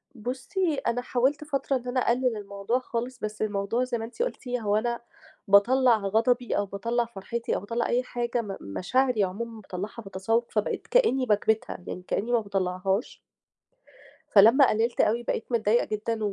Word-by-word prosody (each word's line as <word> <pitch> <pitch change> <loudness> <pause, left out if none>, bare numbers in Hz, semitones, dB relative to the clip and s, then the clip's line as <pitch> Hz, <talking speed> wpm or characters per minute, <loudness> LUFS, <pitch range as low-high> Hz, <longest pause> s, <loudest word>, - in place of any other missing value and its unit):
بُصّي، 265 - -2
أنا 245 -3 -1
حاولت 265 +5 0
فترة 275 -2 -1
إن 250 0 -10
أنا 255 +1 0
أقلِّل 245 -1 +1
الموضوع 200 +4 -2
خالص، 245 0 -4
بس 215 -1 -5
الموضوع 210 +3 0
زي 250 -1 -2
ما 225 - -4
أنتِ 245 - -7
قُلتِ - - -3
هو 225 -5 0
أنا 235 +2 0 0.5
باطلّع 235 +5 +5
غضبي 225 +5 +1
أو 205 - +1
باطلّع 230 +5 -1
فرحتي 230 +2 -4
أو - - -1
باطلّع 230 +4 -2
أي 245 +1 +1
حاجة 240 -1 -2
م 195 -3 -6
مشاعري 230 - +1
عمومًا 220 +4 -4
باطلّعها 205 +5 -6
بالتسوّق، 210 +4 -1
فبقيت 210 -1 -2
كإنّي 270 - +3
باكْبِتها، 215 -3 0
يعني 180 - -6
كإنّي 230 +5 -1
ما 240 - +4
باطلَّعهاش. 195 0 -2 1.1
فلما 230 +7 +7
قلِّلت 230 +3 +1
أوي، 235 +3 +1
بقيت 225 - -2
متضايقة 230 0 +2
جدًا 220 +1 -2
230 Hz, 160 wpm, -27 LUFS, 205-245 Hz, 1.1 s, فلما